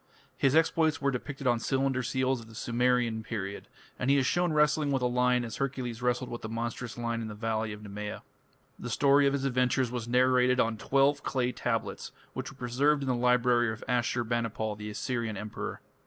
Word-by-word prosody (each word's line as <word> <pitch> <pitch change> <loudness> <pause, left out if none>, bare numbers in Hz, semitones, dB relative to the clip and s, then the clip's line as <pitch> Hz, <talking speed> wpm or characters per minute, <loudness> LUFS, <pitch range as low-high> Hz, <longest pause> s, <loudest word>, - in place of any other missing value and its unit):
His 135 +1 +2
exploits 160 -1 +3
were 140 -1 +1
depicted 135 +2 -5
on 120 -2 +3
cylinder 135 +1 0
seals 130 +1 0
of 115 - -13
the 110 - -14
Sumerian 120 -1 +1
period, 100 -3 -5 0.3
and 130 - 0
he 140 - +5
is 135 - +2
shown 175 +4 +1
wrestling 150 -1 +3
with 135 -2 0
a - - +3
lion 125 0 +2
as 115 - -6
Hercules 125 -4 -3
wrestled 125 0 0
with 120 - -5
the 110 - -5
monstrous 115 +1 -4
lion 115 -1 -2
in 110 - -4
the 105 - -7
valley 110 0 -2
of 105 0 -8
Nemea. 105 +1 -6 0.6
The 120 - -5
story 140 +3 +4
of 140 - +1
his 140 -1 -1
adventures 125 -1 +1
was 120 -2 -4
narrated 125 +1 +3
on 115 -1 +2
twelve 140 +5 +2
clay 125 -3 0
tablets, - - -3 0.2
which - - -4
were 135 - -14
preserved 140 +4 +1
in 135 - -2
the - - +3
library 125 -1 +3
of 110 - -7
Ashur 120 0 +1
banipal, 115 -2 -2
the 105 0 -7
Assyrian 115 -1 -3
emperor. 105 +1 -5
125 Hz, 200 wpm, -29 LUFS, 115-135 Hz, 0.6 s, he